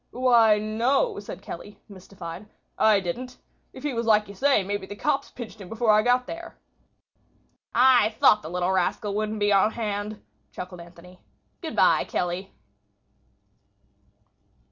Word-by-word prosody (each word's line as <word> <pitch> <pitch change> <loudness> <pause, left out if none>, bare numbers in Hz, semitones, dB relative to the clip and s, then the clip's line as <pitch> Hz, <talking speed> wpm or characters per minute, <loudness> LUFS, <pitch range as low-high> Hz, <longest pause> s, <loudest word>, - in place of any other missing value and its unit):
"Why, 235 -4 +4
no," 240 - 0
said - - -9
Kelly, 205 - -9
mystified. 185 -1 -10 0.3
"I 215 -2 +4
didn't. 245 +8 -5 0.3
If 260 - -12
he 295 -2 -2
was 230 -1 -2
like 215 -1 +4
you 200 - -10
say, 265 0 +2
maybe 200 0 -4
the 205 - -8
cops 280 +4 -1
pinched 225 -4 -10
him 185 - -10
before 225 0 +1
I 210 0 +5
got 245 +2 +2
there." 340 +4 -8 1.2
"I 245 -3 +5
thought 210 - +5
the 155 - -8
little 180 +1 -1
rascal 190 +3 0
wouldn't 215 +1 -2
be 205 0 +2
on 200 +2 +3
hand," 210 -1 -4 0.3
chuckled 180 -1 -8
Anthony. 175 +1 -15 0.4
"Good - - -6
by, - - +4
Kelly." 180 +2 -3
210 Hz, 145 wpm, -25 LUFS, 190-240 Hz, 1.2 s, I